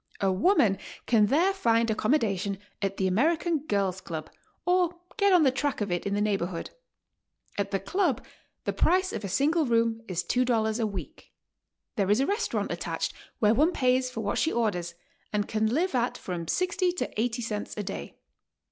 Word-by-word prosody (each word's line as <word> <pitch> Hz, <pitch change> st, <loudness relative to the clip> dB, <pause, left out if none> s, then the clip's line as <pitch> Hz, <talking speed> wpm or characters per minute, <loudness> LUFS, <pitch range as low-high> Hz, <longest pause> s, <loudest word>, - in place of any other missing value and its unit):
A 195 Hz, -1 st, +2 dB
woman 200 Hz, -, +3 dB, 0.3 s
can 215 Hz, -3 st, +4 dB
there 340 Hz, -, +3 dB
find 230 Hz, -, +2 dB
accommodation 205 Hz, -5 st, +1 dB, 0.2 s
at 195 Hz, -1 st, -1 dB
the 190 Hz, -, 0 dB
American 315 Hz, -, +2 dB
Girls' 200 Hz, -9 st, -1 dB
Club 160 Hz, -2 st, -6 dB, 0.3 s
or 360 Hz, -1 st, +2 dB, 0.2 s
get 400 Hz, -2 st, +3 dB
on 360 Hz, -3 st, +6 dB
the 265 Hz, -, +5 dB
track 280 Hz, +2 st, -1 dB
of 205 Hz, -3 st, -2 dB
it 175 Hz, +2 st, -1 dB
in 200 Hz, -, 0 dB
the 205 Hz, -, 0 dB
neighborhood. 195 Hz, -5 st, -1 dB, 0.8 s
At 200 Hz, -, -1 dB
the 195 Hz, -, 0 dB
Club 295 Hz, -, 0 dB, 0.4 s
the -, -, -1 dB
price 370 Hz, +2 st, +2 dB
of -, -, -4 dB
a 200 Hz, -, -3 dB
single 300 Hz, -, +2 dB
room 230 Hz, -1 st, +2 dB
is 180 Hz, -1 st, -2 dB
$2 230 Hz, -2 st, +1 dB
a 225 Hz, -, +1 dB
week. 200 Hz, -3 st, -8 dB, 0.7 s
There 200 Hz, -2 st, +1 dB
is 210 Hz, +3 st, +4 dB
a 270 Hz, -, +3 dB
res 410 Hz, +7 st, 0 dB
taurant -, -, -2 dB
attached -, -, -3 dB, 0.2 s
where 215 Hz, -2 st, +4 dB
one 310 Hz, +9 st, +3 dB
pays 255 Hz, -2 st, +2 dB
for 230 Hz, -, -5 dB
what 205 Hz, -1 st, -1 dB
she 320 Hz, -, +2 dB
orders 180 Hz, -7 st, -1 dB, 0.4 s
and 210 Hz, -1 st, 0 dB
can 220 Hz, 0 st, +1 dB
live 320 Hz, +11 st, 0 dB
at 245 Hz, -1 st, 0 dB
from 175 Hz, -3 st, -5 dB
60 365 Hz, -, +1 dB
to 285 Hz, -10 st, -2 dB
80 240 Hz, +1 st, -1 dB
cents 210 Hz, -2 st, -4 dB
a 210 Hz, -, -2 dB
day. 195 Hz, -, -6 dB
225 Hz, 185 wpm, -28 LUFS, 200-305 Hz, 0.8 s, on